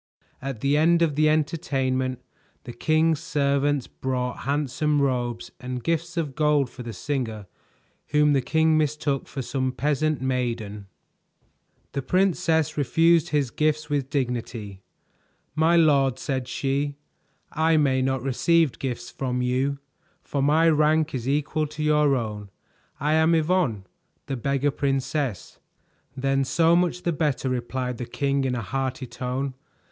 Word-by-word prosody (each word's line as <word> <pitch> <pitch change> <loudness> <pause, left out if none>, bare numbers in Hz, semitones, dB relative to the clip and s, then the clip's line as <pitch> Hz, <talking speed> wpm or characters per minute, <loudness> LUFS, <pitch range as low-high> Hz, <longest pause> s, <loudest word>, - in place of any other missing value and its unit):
At 135 -4 -5
the 140 +2 +2
end 170 +2 +4
of 160 -3 +1
the 155 +1 +3
entertainment, 135 -5 0 0.4
the 120 - -8
king's 155 +4 +2
servants 140 -3 0
brought 125 -1 -3
handsome 150 +1 0
robes 120 -4 -1
and 125 -1 -5
gifts 170 +3 -1
of 150 -5 -1
gold 150 -3 +2
for 125 - -10
the 120 -1 -6
singer 110 -1 -3 0.6
whom 150 0 +3
the 135 - +3
king 160 +3 +2
mistook 150 -2 -1
for 135 -2 -5
some 130 +1 -1
peasant 150 +2 0
maiden. 120 -6 -3 1.0
The 140 - -2
princess 165 -2 +1
refused 165 +3 +3
his 145 -5 0
gifts 155 0 0
with 140 -2 0
dignity. 120 -7 -3 0.7
"My 160 +3 +3
lord," 140 -6 +4
said 130 -3 -3
she, 140 +2 -1 0.6
"I 160 0 +2
may 135 -3 +2
not 130 -1 0
receive 150 +2 +2
gifts 125 -2 -4
from 125 0 -2
you, 130 +3 0 0.5
for 140 - -2
my 155 +4 +4
rank 155 0 +3
is 130 -1 -3
equal 150 +2 0
to 155 +1 -6
your 150 -2 +3
own. 105 -4 -4 0.5
I 150 +2 +1
am 160 +1 +4
Yvonne, 155 - +1 0.4
the 135 - -3
Beggar 140 +3 0
Princess." 135 - -2 0.6
"Then 135 +1 +1
so 165 +5 +3
much 180 0 +1
the 170 - 0
better," 145 -3 0
replied 125 0 -3
the 120 - -4
king 140 +2 0
in 125 -1 0
a 120 - -3
hearty 130 +3 -3
tone. 125 +2 -3
140 Hz, 140 wpm, -25 LUFS, 130-155 Hz, 1.0 s, end